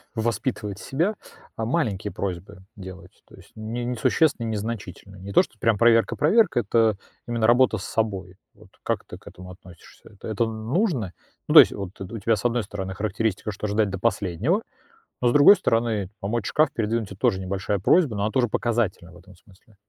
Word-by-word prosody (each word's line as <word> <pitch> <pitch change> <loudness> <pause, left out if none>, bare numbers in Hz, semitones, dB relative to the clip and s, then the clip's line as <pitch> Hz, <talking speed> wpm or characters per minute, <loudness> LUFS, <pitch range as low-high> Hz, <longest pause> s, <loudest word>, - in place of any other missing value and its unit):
воспитывать 110 -2 -2
себя, 170 +10 -1 0.4
а, 110 - -3
маленькие 110 - -1
просьбы 95 0 -6
делать, 95 -2 -12
то - - -16
есть - - -18
не 115 +3 -5
несущественные, 125 +1 +1
незначительные. 100 -3 -6
Не 100 +1 -8
то, - - +6
что 110 - -9
прям 115 -3 +2
проверка-проверка, 120 - +3
это 110 -1 +2 0.3
именно 115 -2 0
работа 120 -1 +4
с 95 - -7
собой. 95 -5 -3 0.2
Вот - - -20
как - - -2
ты - - -10
к - - -24
этому 90 0 -11
относишься? 90 -2 -16
Это 100 - -12
это 110 +2 0
нужно? 115 - -2 0.3
Ну, - - 0
то - - +12
есть - - +2
вот 100 -2 -6
это 95 +4 -7
у - - -4
тебя, 115 +2 +2
с 105 - -7
одной 120 -1 +1
стороны, 95 -1 -6
характеристика, 105 +1 -2
что 105 +2 -5
ждать 105 0 +1
до 95 -1 -5
последнего, 110 - 0 0.6
но 125 - +2
с - - +4
другой 145 +8 +8
стороны, 115 - 0
помочь 105 +1 -3
шкаф 155 -2 +2
передвинуть- 110 -1 -1
это 95 - -9
тоже 95 - +1
небольшая 100 +2 -2
просьба, 140 - +3
но 100 - -2
она 110 - -1
тоже 125 -3 +1
показательна 110 -6 -2
в - - -14
этом 95 +2 -17
смысле. 100 +4 -24
110 Hz, 190 wpm, -24 LUFS, 95-120 Hz, 0.6 s, то